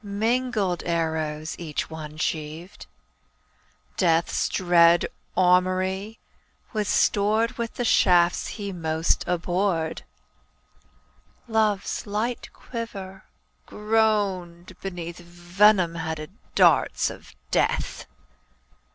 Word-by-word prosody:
Mingled 215 -2 0
arrows 160 -2 -2
each 160 -4 -3
one 155 -1 -8
sheaved; 155 +4 -4 1.1
Death's 165 -2 +2
dread 175 -2 +4 0.3
armoury 185 +3 +2 0.6
was 210 -2 -1
stored 215 +4 +2
With 230 -1 -3
the 245 - -2
shafts 175 -5 +4
he 200 -2 -4
most 160 -1 0
abhorred; 175 -1 -1 1.5
Love's 220 -1 0
light 220 +4 -2
quiver 195 -6 -8 0.4
groaned 200 -5 0
beneath 175 -3 -6
Venom 175 +2 +2
headed 160 -2 -5 0.2
darts - - +3
of - - -14 0.2
Death. - - 0
185 Hz, 80 wpm, -25 LUFS, 170-210 Hz, 1.5 s, dread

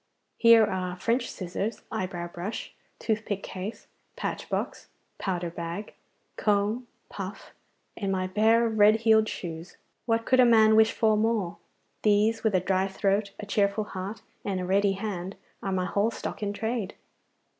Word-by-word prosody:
Here 230 -1 +7
are 185 -2 -3
French 235 +6 0
scissors, 195 +4 -4
eyebrow 180 -2 -3
brush, 175 +6 -6 0.2
toothpick 215 -3 -2
case, 190 +4 -6 0.3
patch - - -4
box, - - -3 0.3
powder 175 -3 -2
bag, 170 +4 -6 0.4
comb, 210 +4 +1 0.2
puff, 195 +1 -8 0.4
and 195 -2 -2
my 185 -1 0
pair 220 +4 +4
of 220 -1 -1
red 215 +2 +6
heeled 220 -1 +4
shoes. 165 0 -7 0.3
What 230 0 +1
could 255 - +3
a - - +9
man 220 -2 +6
wish 220 0 +6
for 220 -1 +2
more? 215 -5 0 0.4
These, 215 +2 +3
with 220 -3 +2
a - - +5
dry 190 +1 +1
throat, 200 +1 0
a 215 - -5
cheerful 200 +1 +1
heart, 200 +1 -6 0.2
and 195 -2 -2
a 180 - -3
ready 195 +2 +3
hand, 195 -2 -4 0.3
are 195 - -2
my 185 -1 0
whole 200 +3 +1
stock 230 - -6
in 205 -1 -1
trade. 220 0 -3
205 Hz, 155 wpm, -27 LUFS, 185-220 Hz, 0.4 s, a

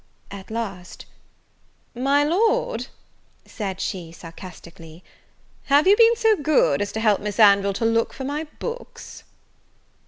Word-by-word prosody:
At 195 -1 -10
last, 200 -6 -6 0.9
"My 275 +4 +1
Lord" 450 +10 0 0.6
said 195 -4 -6
she, 175 -4 -5
sarcastically, 170 0 -13 0.6
"have 285 +2 +3
you 395 +2 +6
been 460 +1 +5
so 445 -2 +3
good 290 - +2
as 205 0 -3
to 220 - -3
help 215 -3 +2
Miss 210 +1 -5
Anville 200 -2 +5
to 225 - -2
look 230 0 +1
for 265 - -8
my 290 +4 -3
books?" 480 0 -8
225 Hz, 130 wpm, -22 LUFS, 195-310 Hz, 0.9 s, you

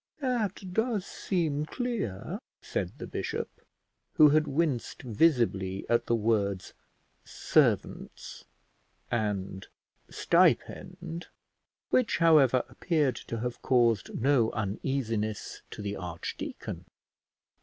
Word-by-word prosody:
"That 215 - -2
does 220 -2 0
seem 155 -5 -1
clear," 205 - -3 0.2
said - - -4
the - - -6
bishop, - - -4 0.5
who 150 -1 +8
had 155 +1 +3
winced 145 -3 -1
visibly 105 - +1
at 120 - +2
the 120 - +3
words 105 -4 0 0.5
servants - - 0 0.7
and 100 -4 -2 0.4
stipend, 170 +2 +1 0.6
which, 255 -3 +3
however, 145 -7 +5
appeared 150 -7 0
to 115 -1 -3
have 125 0 -4
caused 120 -5 +2
no 130 -3 +3
uneasiness 110 0 -2
to 105 - -7
the 100 0 -3
archdeacon. 90 -3 -6
125 Hz, 95 wpm, -29 LUFS, 105-165 Hz, 0.7 s, who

